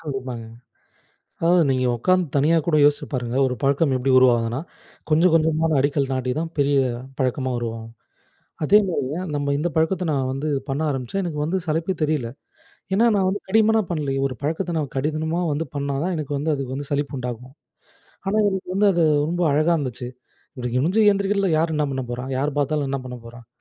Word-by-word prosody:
கண்டிப்பாங்க. 130 -6 -5 1.0
அதான், 170 -1 +4
நீங்க 130 -1 +1
உட்காந்து 185 +6 +2
தனியா 155 +4 +4
கூட 165 - +2
யோசிச்சு 145 0 +3
பாருங்க. 125 -1 -2
ஒரு 125 - -2
பழக்கம் 140 +1 +2
எப்படி 130 +1 0
உருவாகுதுன்னா, 120 -1 +3 0.5
கொஞ்சம், 165 +3 +4
கொஞ்சமான 160 -1 +2
அடிக்கல் 140 0 +1
நாட்டி 130 -1 -1
தான், 165 0 -3
பெரிய 140 0 +2 0.4
பழக்கமா 130 0 0
உருவாகும். 115 -1 -6 0.7
அதேமாரிங்க, 170 -6 +2 0.2
நம்ம 145 0 0
இந்த 165 +4 -1
பழக்கத்த 165 +3 +1
நான் 135 -2 0
வந்து, 140 +3 -3 0.2
பண்ண 135 +3 -1
ஆரம்பிச்சேன், 135 +7 -2
எனக்கு 160 -4 -4
வந்து 175 +5 0
சலிப்பே 165 +4 -1
தெரியல. 150 -5 0 0.7
ஏன்னா, 225 +4 +4
நான் 190 -1 +2
வந்து 200 +2 -2
கடிமனா 220 +1 +4
பண்லையே. 145 -5 -1
ஒரு 130 - -6
பழக்கத்த 165 +4 -2
நான் 145 -4 -3
கடிதனமா 155 +4 -1
வந்து 150 +3 -1
பண்ணா 140 0 -2
தான் 185 0 -1
எனக்கு 150 -2 -4
வந்து, 155 +3 -1
அதுக்கு 135 -2 -4
வந்து 140 0 -5
சலிப்பு 145 0 -1
உண்டாகும். 125 0 -6 0.7
ஆனா, 195 +2 0
எனக்கு 190 -2 -4
வந்து 205 +1 +4
அது, 170 -2 +2 0.2
ரொம்ப 175 +2 -1
அழகா 155 +4 +3
இருந்துச்சு. 125 -3 -4 0.5
இப்படி 125 -1 -3
குனிஞ்சு 170 +12 +2
எந்திரிக்றதுல, 200 -1 0
யாரு 165 +1 +1
என்ன 150 - +1
பண்ண 130 0 -2
போறா? 125 +1 -4
யாரு 145 +2 0
பார்த்தாலும், 145 0 0
என்ன 135 -1 -2
பண்ண 125 -1 -7
போறான்? 120 0 -12
145 Hz, 175 wpm, -22 LUFS, 130-165 Hz, 1.0 s, அதான்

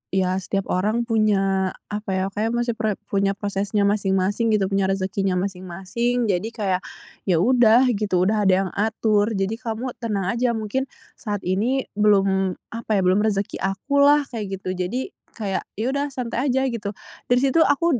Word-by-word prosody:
"Ya, 185 0 +1
setiap 195 +1 -3
orang 215 +6 +1
punya 195 -4 +1 0.2
apa 210 0 -4
ya, 190 - 0
kayak 225 +4 -1
masih 240 0 0
pre 215 -2 0 0.2
punya 195 0 +1
prosesnya 200 0 -1
masing-masing," 200 +2 +1
gitu, 195 -1 0
"punya 195 -1 +2
rezekinya 195 0 -1
masing-masing." 195 +5 -1
Jadi 185 +4 -1
kayak, 190 -4 0 0.5
"Ya, 175 -2 +3
udah 245 -1 +5
gitu, 200 -5 +1
udah 210 0 +2
ada 190 - +5
yang 185 - -5
atur. 215 0 +1
Jadi 195 +4 -1
kamu 235 +2 -4
tenang 200 -5 -1
aja, 235 0 0
mungkin 225 +5 -2 0.3
saat 205 -4 -4
ini 225 +9 0 0.2
belum 195 -3 +3 0.2
apa 230 -1 -6
ya, 195 - +3
belum 185 +2 +3
rezeki 205 -2 -1
akulah." 280 +9 +3
Kayak 195 -4 -5
gitu. 185 0 -3
Jadi, 245 - -2 0.2
kayak 200 -4 -3
ya 230 +5 -1
udah, 280 +1 -1
santai 255 0 -3
aja 265 +1 +2
gitu. 205 -3 -4 0.3
Dari 245 0 +4
situ, 275 +4 +3
aku 290 -2 +3
210 Hz, 165 wpm, -23 LUFS, 195-235 Hz, 0.5 s, udah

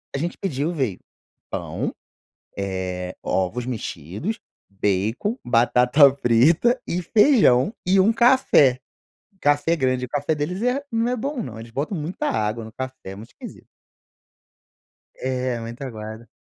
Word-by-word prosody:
a - - 0
gente 170 +4 -3
pediu, 155 -3 -2
veio: 130 - -2 0.5
pão, - - -3 0.6
eh, 95 -2 -4
ovos 110 +6 -1
mexidos, 110 - -5 0.3
bacon, 105 - -1
batata 125 +4 +5
frita 150 - +3
e 180 +1 -1
feijão 210 - +4
e 190 +1 +4
um 215 +4 +4
café. 235 - +4 0.6
Café 145 +3 +2
grande 130 -2 0
o - - -14
café 145 +2 -1
deles 180 +7 -3
é 250 +3 0
não 230 +1 +1
é 250 - 0
bom 275 +3 -3
não, 115 -5 -7
eles 115 0 -10
botam 150 - -3
muita 155 +4 -3
água 110 +1 -1
no 110 - -10
café, 130 -6 -7
é - - -8
muito 110 +3 -11
esquisito. - - -11 1.5
É, 130 -2 -2
muito 115 +3 -8
aguado. 110 -1 -8
130 Hz, 140 wpm, -23 LUFS, 115-180 Hz, 1.5 s, batata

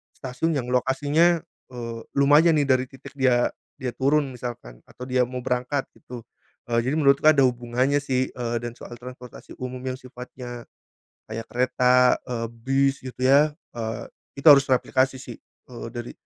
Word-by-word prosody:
stasiun 135 +5 -2
yang 125 -2 -3
lokasinya, 145 +7 +2 0.3
eee, 115 -2 -6 0.2
lumayan 150 +4 +5
nih 145 - +3
dari 130 -1 +3
titik 135 0 -13
dia 125 -2 +3 0.3
dia 125 -2 -3
turun 140 0 +1
misalkan 115 - -8
atau 125 - -11
dia 125 -1 +2
mau 125 0 -5
berangkat 125 +2 -1 0.2
gitu, 120 -2 -10 0.5
eee, 115 - +3
jadi 135 +5 -1
menurutku 140 0 +4
ada 140 -3 +6
hubungannya 125 +3 0
sih, 130 -2 -1
eee, 120 -1 -3
dan 120 - -4
soal 120 - -10
transportasi 125 0 -11
umum 125 0 -5
yang 130 -1 -3
sifatnya 125 -1 -9 0.7
kayak 115 +1 -6
kereta, 125 0 +3 0.2
eee, 115 -1 -2
bis 135 +4 0
gitu 130 -1 -9
ya, 145 +3 +5 0.3
eee, 110 -1 -4 0.3
itu 150 - -1
harus 140 -1 +8
replikasi 130 0 +1
sih, 120 - -9 0.3
eee, 120 -1 -8
dari 120 0 -6
130 Hz, 160 wpm, -24 LUFS, 120-135 Hz, 0.7 s, harus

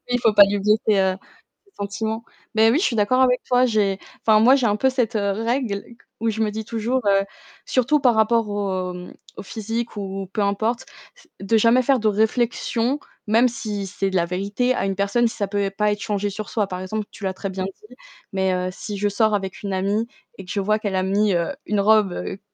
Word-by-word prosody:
Oui, - - -11
il 245 -1 +1
faut 225 - +3
pas 205 -1 +9
lui 200 +1 -1
blesser, 210 0 +2
heu, 190 -1 +1 0.5
ses 400 - -28
sentiments. 220 +3 -3 0.3
Beh 220 +1 +5
oui, 295 - +2
je - - 0
suis 235 - 0
d'accord 240 +5 +2
avec 250 -1 +3
toi. 250 0 +3
J'ai 205 -4 +1 0.3
enfin 215 -1 +6
moi 250 +5 +6
j'ai 255 -4 +1
un 205 - +2
peu 265 +5 +2
cette, 245 -3 -1
heu, 200 -1 +1
règle 225 -1 -1
qu 235 - -17 0.2
où 230 - +1
je 220 - -4
me 215 - +2
dis 220 +1 -5
toujours, 235 +4 -1
heu 195 0 +4 0.4
surtout 270 +4 +2
par 245 -4 +3
rapport 220 0 +3
au 190 -3 -2
mmh, 180 0 -9 0.2
au - - -6
physique 225 +2 -4
ou 195 -1 -5
peu 215 - -1
importe, 220 +5 0 0.3
c - - -22
de 210 +3 +2
jamais 230 +3 +4
faire 265 0 +2
de 215 - 0
réflexion, 230 +4 0 0.3
même 230 +4 +4
si 210 -4 -4
c'est 195 0 -2
de 190 - -5
la 170 - +2
vérité, 200 +8 -1
à 195 - -1
une 195 -1 -1
personne 200 +5 +2
si, - - -6
ça 200 -3 -2
peut 205 0 -1
et 195 - -1
pas 210 +1 +1
être 205 - -2
changé 205 -1 -1
sur 210 +2 -6
soi. 210 -3 0
Par 180 -1 -5
exemple, 210 +3 -3
tu 200 - -8
l'as 190 - -1
très 195 +1 -5
bien 190 0 -3
dit, 420 - -11 0.4
mais 190 -1 +1
heu, 180 0 -1
si 205 +2 -6
je 205 +1 0
sors 215 +1 +2
avec 195 -2 -3
une 200 - -3
amie 200 +4 0 0.3
et 190 - -9
que - - -8
je 200 - -1
vois 215 +2 +1
qu'elle 205 -3 -3
a 185 - +1
mis, 200 +1 +2
heu, 170 -1 0
une 205 -1 +1
robe, 210 -3 +4
heu, 195 - -5
210 Hz, 245 wpm, -22 LUFS, 195-230 Hz, 0.5 s, pas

